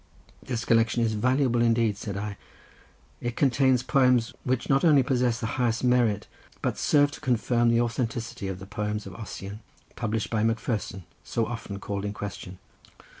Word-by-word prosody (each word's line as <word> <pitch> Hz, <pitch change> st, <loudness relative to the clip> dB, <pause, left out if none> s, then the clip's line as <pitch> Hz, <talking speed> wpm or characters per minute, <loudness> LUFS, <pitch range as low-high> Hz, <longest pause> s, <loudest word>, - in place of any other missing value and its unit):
"This 120 Hz, -3 st, -4 dB
collection 115 Hz, +1 st, +3 dB
is 110 Hz, -1 st, +1 dB
valuable 125 Hz, +2 st, +2 dB
indeed," 115 Hz, -2 st, +3 dB
said 100 Hz, 0 st, -5 dB
I; 105 Hz, 0 st, -4 dB, 0.9 s
"it 120 Hz, -1 st, -3 dB
contains 130 Hz, -2 st, +3 dB
poems, 125 Hz, -4 st, +3 dB
which 130 Hz, -1 st, -1 dB
not 135 Hz, -1 st, +3 dB
only 150 Hz, -5 st, +6 dB
possess 125 Hz, -2 st, +1 dB
the 115 Hz, -, -3 dB, 0.2 s
highest 115 Hz, -1 st, +1 dB
merit, 125 Hz, -5 st, +2 dB, 0.4 s
but -, -, -1 dB
serve 145 Hz, -1 st, +4 dB
to -, -, -10 dB
confirm 120 Hz, -1 st, +2 dB
the 115 Hz, 0 st, +3 dB
authenticity 115 Hz, -3 st, -2 dB
of 95 Hz, -1 st, -4 dB
the 95 Hz, -, -9 dB
poems 105 Hz, +1 st, -3 dB
of 95 Hz, -, -8 dB
Ossian, 100 Hz, 0 st, -7 dB, 0.4 s
published 110 Hz, -2 st, -2 dB
by 110 Hz, -2 st, +1 dB
Macpherson, 110 Hz, -4 st, -1 dB, 0.2 s
so 115 Hz, -, -1 dB
often 115 Hz, -3 st, -6 dB
called 100 Hz, 0 st, -4 dB
in 105 Hz, 0 st, -3 dB
question. 100 Hz, -3 st, -7 dB
115 Hz, 165 wpm, -27 LUFS, 105-125 Hz, 0.9 s, only